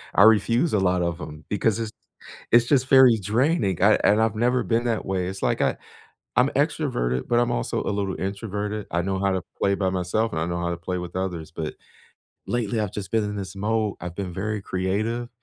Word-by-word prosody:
I 100 Hz, -, +7 dB
refuse 115 Hz, -, +4 dB
a 105 Hz, -, +3 dB
lot 90 Hz, -1 st, +2 dB
of 85 Hz, 0 st, -2 dB
'em 75 Hz, 0 st, -9 dB
because 110 Hz, +2 st, 0 dB
it's 110 Hz, -2 st, -3 dB, 0.6 s
it's 120 Hz, 0 st, +6 dB
just 130 Hz, 0 st, +2 dB
very 130 Hz, -4 st, +7 dB
draining. 105 Hz, -, +1 dB
I 105 Hz, +1 st, +6 dB
and 105 Hz, -, +4 dB
I've 110 Hz, -1 st, +1 dB
never 125 Hz, +2 st, +2 dB
been 120 Hz, +1 st, 0 dB
that 115 Hz, -2 st, -1 dB
way. 95 Hz, -2 st, -1 dB
It's 95 Hz, +1 st, -6 dB
like -, -, +1 dB
I -, -, +1 dB, 0.6 s
I'm -, -, +5 dB
extroverted, 60 Hz, +1 st, -1 dB
but 120 Hz, -, +3 dB
I'm 120 Hz, -, +1 dB
also -, -, -1 dB
a -, -, -1 dB
little 100 Hz, -1 st, -2 dB
introverted. 105 Hz, +1 st, -4 dB
I 85 Hz, -, +1 dB
know 95 Hz, +1 st, -2 dB
how 100 Hz, 0 st, +1 dB
to 95 Hz, -1 st, -1 dB, 0.2 s
play 100 Hz, 0 st, +2 dB
by 95 Hz, -1 st, 0 dB
myself, 95 Hz, +5 st, -1 dB
and 80 Hz, -, -2 dB
I -, -, 0 dB
know 85 Hz, 0 st, -2 dB
how 85 Hz, 0 st, -1 dB
to 85 Hz, -, -3 dB
play 90 Hz, +2 st, -4 dB
with 90 Hz, 0 st, -7 dB
others 90 Hz, -5 st, -4 dB
but 80 Hz, -1 st, -5 dB, 0.7 s
lately, 115 Hz, -2 st, -1 dB
I've 105 Hz, -3 st, -2 dB
just 100 Hz, -2 st, -6 dB
been 110 Hz, -2 st, +1 dB
in 105 Hz, 0 st, -4 dB
this 95 Hz, -1 st, -6 dB
mode. 105 Hz, 0 st, 0 dB
I've 90 Hz, -1 st, -6 dB
been 95 Hz, -1 st, -4 dB
very 105 Hz, +2 st, -2 dB
creative, 105 Hz, +7 st, -2 dB
100 Hz, 220 wpm, -24 LUFS, 90-110 Hz, 0.7 s, I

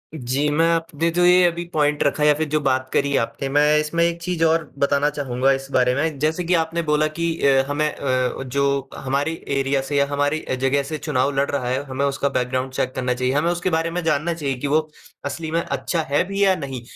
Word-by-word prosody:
जी। 135 Hz, +1 st, -1 dB
मैं 160 Hz, +3 st, +2 dB
आपने 165 Hz, 0 st, -1 dB
जो 180 Hz, -, +3 dB
ये 180 Hz, +1 st, +6 dB
अभी 170 Hz, 0 st, -2 dB
पॉइंट 150 Hz, -1 st, +1 dB
रखा 150 Hz, +1 st, 0 dB
या 150 Hz, 0 st, +6 dB
फ़िर 155 Hz, +1 st, -2 dB
जो 155 Hz, +1 st, +1 dB
बात 130 Hz, -1 st, 0 dB
करी 140 Hz, 0 st, +1 dB
आपने, 135 Hz, +4 st, -2 dB
मैं 150 Hz, +2 st, +4 dB
इसमें 155 Hz, +2 st, 0 dB
एक 170 Hz, 0 st, 0 dB
चीज़ 175 Hz, -1 st, -1 dB
और 165 Hz, 0 st, +2 dB, 0.2 s
बताना 140 Hz, +1 st, +2 dB
चाहूँगा 135 Hz, -2 st, 0 dB
इस 135 Hz, 0 st, -2 dB
बारे 125 Hz, -1 st, +3 dB
में। 155 Hz, +1 st, -1 dB
जैसे 155 Hz, +4 st, 0 dB
कि 175 Hz, +1 st, 0 dB
आपने 165 Hz, +1 st, -2 dB
बोला 150 Hz, 0 st, +3 dB
कि 170 Hz, 0 st, 0 dB, 0.2 s
अ, 135 Hz, -1 st, +4 dB
हमें 145 Hz, +2 st, 0 dB
अ, 130 Hz, -1 st, -1 dB
जो 140 Hz, +1 st, -1 dB
हमारी 140 Hz, +4 st, -1 dB, 0.2 s
एरिया 135 Hz, 0 st, +1 dB
से 140 Hz, +2 st, -3 dB
या 140 Hz, -, +4 dB
हमारी 145 Hz, +2 st, 0 dB
अ, -, -, -3 dB
जगह 140 Hz, +1 st, +2 dB
से 155 Hz, +3 st, -5 dB
चुनाव 135 Hz, 0 st, 0 dB
लड़ 140 Hz, +1 st, +1 dB
रहा 135 Hz, -3 st, -2 dB
है, 130 Hz, +2 st, 0 dB
हमें 135 Hz, 0 st, -2 dB
उसका 140 Hz, 0 st, 0 dB
बैकग्राउंड 130 Hz, 0 st, -2 dB
चेक 130 Hz, 0 st, -1 dB
करना 125 Hz, -1 st, 0 dB
चाहिए। 125 Hz, +1 st, -1 dB
हमें 150 Hz, +4 st, +1 dB
उसके 175 Hz, +1 st, -1 dB
बारे 165 Hz, +1 st, -1 dB
में 180 Hz, +1 st, -3 dB
जानना 160 Hz, +1 st, 0 dB
चाहिए 145 Hz, -5 st, -3 dB
कि 145 Hz, -, -2 dB
वो 150 Hz, +3 st, +3 dB, 0.5 s
असली 155 Hz, +3 st, -4 dB
में 165 Hz, +1 st, +1 dB
अच्छा 140 Hz, +3 st, -2 dB
है 145 Hz, -, +2 dB
भी 200 Hz, +1 st, 0 dB
या 190 Hz, -1 st, +4 dB
नहीं। 135 Hz, -6 st, -6 dB
145 Hz, 235 wpm, -22 LUFS, 135-160 Hz, 0.5 s, ये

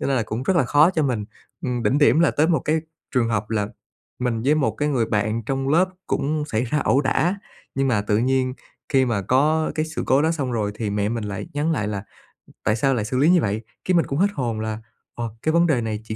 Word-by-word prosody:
cho -, -, -1 dB
nên 135 Hz, -, +1 dB
là 120 Hz, -, +2 dB
cũng 110 Hz, +3 st, -4 dB
rất 175 Hz, +7 st, +1 dB
là 165 Hz, -, +4 dB
khó 150 Hz, +7 st, +5 dB
cho 160 Hz, -4 st, 0 dB
mình. 125 Hz, -7 st, -1 dB, 0.4 s
Ừm, 125 Hz, -2 st, -1 dB
đỉnh 120 Hz, +6 st, +2 dB
điểm 145 Hz, 0 st, +5 dB
là 170 Hz, -, +4 dB
tới 155 Hz, +2 st, +2 dB
một 160 Hz, -6 st, +2 dB
cái 155 Hz, +4 st, +1 dB, 0.4 s
trường 120 Hz, -3 st, +2 dB
hợp 105 Hz, -1 st, -2 dB
là 105 Hz, -2 st, 0 dB, 0.5 s
mình 120 Hz, -3 st, -1 dB
với 140 Hz, +5 st, +3 dB
một 155 Hz, -3 st, +1 dB
cái 150 Hz, -, -1 dB
người 120 Hz, -5 st, +1 dB
bạn 110 Hz, +2 st, 0 dB
trong 135 Hz, +3 st, -2 dB
lớp 175 Hz, +5 st, +4 dB, 0.2 s
cũng 150 Hz, +1 st, -1 dB
xảy 115 Hz, -4 st, -1 dB
ra 150 Hz, +5 st, 0 dB
ẩu 140 Hz, -, +2 dB
đả, 170 Hz, +7 st, +1 dB, 0.4 s
nhưng 135 Hz, 0 st, +1 dB
mà 105 Hz, -5 st, +2 dB
tự 105 Hz, +1 st, +1 dB
nhiên 130 Hz, +1 st, +1 dB, 0.3 s
khi 135 Hz, -2 st, +3 dB
mà 115 Hz, -5 st, -1 dB
có 150 Hz, +9 st, +2 dB
cái 155 Hz, -, 0 dB
sự 160 Hz, -, -4 dB
cố 135 Hz, +2 st, +4 dB
đó 160 Hz, -, +2 dB
xong 140 Hz, -6 st, -2 dB
rồi 105 Hz, -3 st, -1 dB
thì 105 Hz, -1 st, -3 dB
mẹ 105 Hz, 0 st, 0 dB
mình 115 Hz, -1 st, -3 dB
lại 100 Hz, +4 st, -5 dB
nhắn 150 Hz, +3 st, +1 dB
lại 110 Hz, -9 st, -1 dB
là 100 Hz, -1 st, -4 dB, 0.6 s
"Tại 105 Hz, -, +2 dB
sao 135 Hz, +4 st, +2 dB
lại 110 Hz, -4 st, -1 dB
xử 125 Hz, +4 st, -2 dB
lý 145 Hz, +5 st, +4 dB
như 180 Hz, -1 st, +5 dB
vậy?" 105 Hz, -1 st, -1 dB, 0.2 s
Cái 185 Hz, -, +2 dB
mình 170 Hz, -, +3 dB
cũng 140 Hz, -, -3 dB
hết 195 Hz, -, +5 dB
hồn 120 Hz, -, -2 dB
là, 110 Hz, 0 st, -3 dB, 0.3 s
ồ, 120 Hz, -1 st, -3 dB
cái 155 Hz, -, +1 dB
vấn 170 Hz, +1 st, +4 dB
đề 135 Hz, -7 st, +2 dB
này 110 Hz, -2 st, -3 dB
chỉ 110 Hz, 0 st, -5 dB
130 Hz, 265 wpm, -23 LUFS, 110-150 Hz, 0.6 s, khó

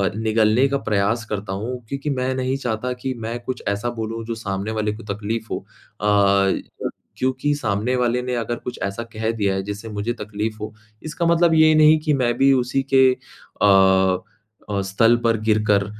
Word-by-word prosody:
निगलने 110 Hz, +3 st, +3 dB
का 140 Hz, -, +1 dB
प्रयास 105 Hz, +3 st, +1 dB
करता 100 Hz, -2 st, -3 dB
हूँ 125 Hz, +2 st, -4 dB
क्योंकि 140 Hz, +2 st, -3 dB
मैं 130 Hz, -1 st, -1 dB
नहीं 130 Hz, +1 st, -1 dB
चाहता 125 Hz, -1 st, -3 dB
कि 130 Hz, -1 st, -1 dB
मैं 115 Hz, +2 st, -4 dB
कुछ 130 Hz, -, -5 dB
ऐसा 100 Hz, +4 st, -1 dB
बोलूँ 115 Hz, +1 st, -4 dB
जो 115 Hz, 0 st, -4 dB
सामने 100 Hz, -1 st, -4 dB
वाले 110 Hz, -1 st, -1 dB
को 110 Hz, +2 st, -10 dB
तकलीफ़ 110 Hz, +2 st, -4 dB
हो -, -, -1 dB, 0.4 s
अ, 100 Hz, -1 st, +3 dB, 0.6 s
क्योंकि 130 Hz, +3 st, 0 dB
सामने 115 Hz, -1 st, -1 dB
वाले 125 Hz, 0 st, +1 dB
ने 125 Hz, 0 st, -2 dB
अगर 120 Hz, 0 st, -2 dB
कुछ 125 Hz, -, -5 dB
ऐसा 100 Hz, +4 st, -3 dB
कह 110 Hz, 0 st, -2 dB
दिया 100 Hz, -4 st, 0 dB
है 95 Hz, -, -2 dB
जिससे 105 Hz, +3 st, -6 dB
मुझे 105 Hz, +2 st, -2 dB
तकलीफ़ 105 Hz, +1 st, -3 dB
हो 110 Hz, +1 st, -5 dB, 0.3 s
इसका 160 Hz, +2 st, -2 dB
मतलब 170 Hz, 0 st, +4 dB
ये 155 Hz, 0 st, +6 dB
नहीं 155 Hz, 0 st, +6 dB
कि 150 Hz, -, +3 dB
मैं 120 Hz, -1 st, +2 dB
भी 135 Hz, +1 st, +5 dB
उसी 130 Hz, +1 st, +1 dB
के 130 Hz, 0 st, +7 dB, 0.6 s
अ -, -, +5 dB, 1.0 s
अ, 100 Hz, -1 st, 0 dB
स्तल 115 Hz, +5 st, +3 dB
पर 115 Hz, -1 st, +3 dB
गिरकर 105 Hz, -2 st, +3 dB
115 Hz, 185 wpm, -22 LUFS, 105-130 Hz, 1.0 s, के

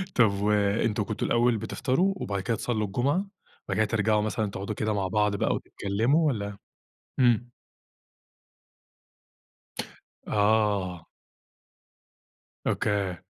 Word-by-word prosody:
طب 115 Hz, -5 st, +5 dB
وأنتم 105 Hz, +1 st, +2 dB
كنتم 110 Hz, +1 st, -3 dB
الأول 120 Hz, -1 st, +3 dB
بتفطَروا 130 Hz, -, 0 dB
وبعد 100 Hz, -, -3 dB
كده 115 Hz, +3 st, -1 dB
تصلّوا 110 Hz, -4 st, -1 dB
الجمعة، 125 Hz, -, +1 dB, 0.5 s
وبعد -, -, -3 dB
كده 110 Hz, -, +4 dB
ترجَعوا 105 Hz, 0 st, +2 dB
مثلًا 105 Hz, -1 st, -1 dB
تقعدوا 100 Hz, +2 st, -4 dB
كده 110 Hz, -1 st, -1 dB
مع 95 Hz, -2 st, 0 dB
بعض 105 Hz, +1 st, +1 dB
بقى -, -, +1 dB
وتتكلموا، 115 Hz, +11 st, +1 dB
والّا؟ 100 Hz, -6 st, -2 dB, 0.6 s
إمم. 120 Hz, -1 st, +3 dB, 2.8 s
آه. 105 Hz, -4 st, +1 dB, 1.6 s
أوكي. 100 Hz, -3 st, 0 dB
105 Hz, 105 wpm, -27 LUFS, 100-115 Hz, 2.8 s, طب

